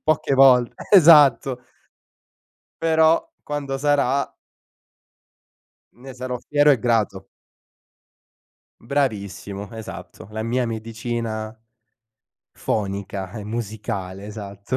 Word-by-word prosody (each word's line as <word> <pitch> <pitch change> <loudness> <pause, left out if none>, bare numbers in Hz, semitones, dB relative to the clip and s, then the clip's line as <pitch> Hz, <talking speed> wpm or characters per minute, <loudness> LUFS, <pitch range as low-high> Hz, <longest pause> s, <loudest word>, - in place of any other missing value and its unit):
poche 155 -2 +1
volt 130 -3 +5 0.2
esatto. 145 - +6 1.2
Però, 160 0 +3
quando 145 -2 -4
sarà 140 -1 +1 1.6
ne 130 +2 -12
sarò 125 0 -5
fiero 145 +3 +3
e 135 - +4
grato. 105 -4 0 1.6
Bravissimo, 100 -6 -3
esatto. 95 -7 -9
La 110 +1 -4
mia 120 +2 -1
medicina 115 -1 -4 1.0
fonica 100 -2 -3
e 105 - -7
musicale, 105 -3 -5
esatto. 100 +2 -6
115 Hz, 80 wpm, -22 LUFS, 105-135 Hz, 1.6 s, esatto